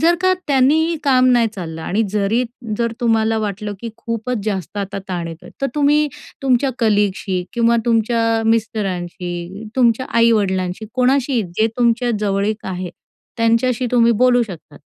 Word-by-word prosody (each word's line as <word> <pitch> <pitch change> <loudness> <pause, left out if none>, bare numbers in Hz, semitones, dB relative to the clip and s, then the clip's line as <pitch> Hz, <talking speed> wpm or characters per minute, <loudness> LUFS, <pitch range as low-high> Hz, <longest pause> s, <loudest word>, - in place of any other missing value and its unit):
जर 335 +2 +4
का 370 0 +4
त्यांनीही 300 +5 +3
काम 255 -2 +4
नाही 235 -2 +4
चाललं 165 -4 -6
आणि 210 +7 0
जरी 210 +4 +1 0.4
जर 235 -1 0
तुम्हाला 225 -1 +2
वाटलं 205 -1 -3
की 235 - -5
खूपच 230 +1 -3
जास्त 195 -2 -3
आता 195 0 -4
ताण 175 -2 -3
येतोय 165 0 -10
तर - - +3
तुम्ही 295 +1 +3 0.4
तुमच्या 265 0 +2
कलीगशी 205 -4 +1
किंवा 235 0 +3
तुमच्या 230 0 +2
मिस्टरांशी, 185 -3 -2
तुमच्या 245 0 +3
आई-वडिलांशी, 200 -3 +1
कोणाशी 255 -1 +2
जे 220 - +3
तुमच्या 240 0 +2
जवळीक 205 +1 -1
आहे 180 -2 -4 0.5
त्यांच्याशी 230 +2 +1
तुम्ही 235 -1 +5
बोलू 245 -1 +5
शकतात 175 -8 -9
225 Hz, 140 wpm, -19 LUFS, 200-245 Hz, 0.5 s, तुम्ही